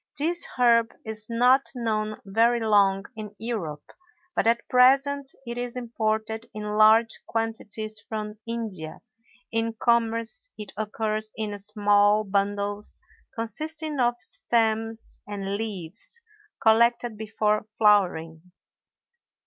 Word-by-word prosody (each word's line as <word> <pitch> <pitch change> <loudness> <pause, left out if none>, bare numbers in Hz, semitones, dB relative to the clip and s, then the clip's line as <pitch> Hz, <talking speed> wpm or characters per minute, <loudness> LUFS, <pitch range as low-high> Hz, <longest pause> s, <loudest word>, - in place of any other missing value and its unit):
This 340 +4 +1
herb 235 -2 +4
is 220 -1 -3
not 250 +3 +4
known 215 -3 -2
very 230 +4 +3
long 200 -3 +3
in 210 -1 -8
Europe, 190 -10 -4 0.5
but - - +1
at 235 +1 +2
present 270 +2 +4
it 235 0 -5
is 245 0 -4
imported 220 -2 -2
in 210 - -5
large 215 +2 +4
quantities 220 -1 -3
from 215 -1 -5
India; 215 -9 -5 0.5
in 225 0 0
commerce 235 - 0
it 210 -1 -8
occurs 215 +1 -2
in 215 -2 -3
small 205 0 +3
bundles 205 +1 -2 0.4
consisting 305 +6 -4
of 240 -1 +3
stems 225 -1 -1
and 200 -1 -3
leaves 205 - -6 0.4
(collected 235 +1 +4
before 215 0 -1
flowering). 180 -5 +2
220 Hz, 110 wpm, -26 LUFS, 210-235 Hz, 0.5 s, herb